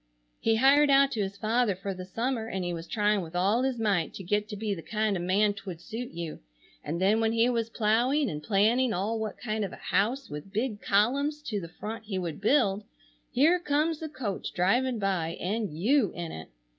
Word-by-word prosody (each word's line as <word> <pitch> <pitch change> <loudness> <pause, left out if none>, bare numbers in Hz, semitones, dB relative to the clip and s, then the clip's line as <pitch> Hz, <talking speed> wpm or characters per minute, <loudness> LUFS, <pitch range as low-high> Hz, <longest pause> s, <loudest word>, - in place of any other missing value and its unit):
He 225 - +2
hired 280 +5 +5
out 275 0 +5
to 220 - -1
his 200 0 -3
father 220 0 +1
for 195 +1 -4
the 185 0 -7
summer 230 +3 -2
and 190 -4 -3
he 175 - -2
was 165 0 -6
trying 210 -2 +1
with 165 0 -8
all 200 +7 +2
his 260 -1 0
might 200 -7 0
to 195 - -7
get 210 +3 0
to 210 - -5
be 210 0 -2
the 170 - -6
kind 215 +4 -1
of 175 - -2
man 200 +4 +2
t'would 190 -4 -8
suit 230 +7 -6
you, 170 -2 -6 0.4
and 165 +3 -3
then 200 +4 +3
when 225 0 +1
he 230 +1 +3
was 230 -2 -1
plowing 240 +7 +2
and 150 -7 -4
planning 225 +7 +2
all 210 +5 -1
what 220 -1 -4
kind 215 -2 -2
of 195 - -3
a - - -6
house 235 +9 0
with 150 +6 -8
big 215 0 -2
columns 280 +9 +1
to 210 -8 -3
the 170 - -8
front 220 +5 -7
he 200 -3 -3
would 170 -2 -4
build 210 -4 +3 0.5
here 310 +8 +4
comes 305 0 0
the 315 - -5
coach 235 -10 -4
driving 240 +8 +2
by 185 -5 -1
and 200 -4 -2
you 230 - +3
in 170 -2 -5
it! 80 - -8
215 Hz, 220 wpm, -28 LUFS, 190-245 Hz, 0.5 s, hired